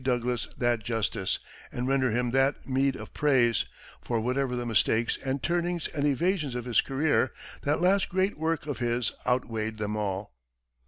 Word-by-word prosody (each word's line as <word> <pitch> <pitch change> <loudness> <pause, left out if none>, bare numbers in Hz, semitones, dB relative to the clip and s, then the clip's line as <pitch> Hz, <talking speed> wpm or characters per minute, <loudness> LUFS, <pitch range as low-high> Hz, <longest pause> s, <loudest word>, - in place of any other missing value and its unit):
Douglas, 125 -2 0
that 120 -3 +1
justice, 110 -4 -1 0.3
and 125 +1 -2
render 135 -1 +2
him 120 +1 0
that 135 +2 +1
meed 135 0 +2
of - - -9
praise; 125 -7 +3 0.4
for 120 -2 -1
whatever 125 +2 0
the 120 0 -2
mistakes 115 0 +2
and 135 0 -2
turnings 175 -1 0
and 145 0 0
evasions 150 -1 +1
of 120 -1 -3
his 120 -2 +3
career, 135 -1 +1 0.3
that 150 +3 0
last 190 +2 +3
great 190 +2 +1
work 160 -1 -1
of 145 -6 -4
his 120 -1 0 0.2
outweighed 115 -3 0
them 105 0 -2
all. 100 - -3
125 Hz, 165 wpm, -28 LUFS, 115-145 Hz, 0.4 s, praise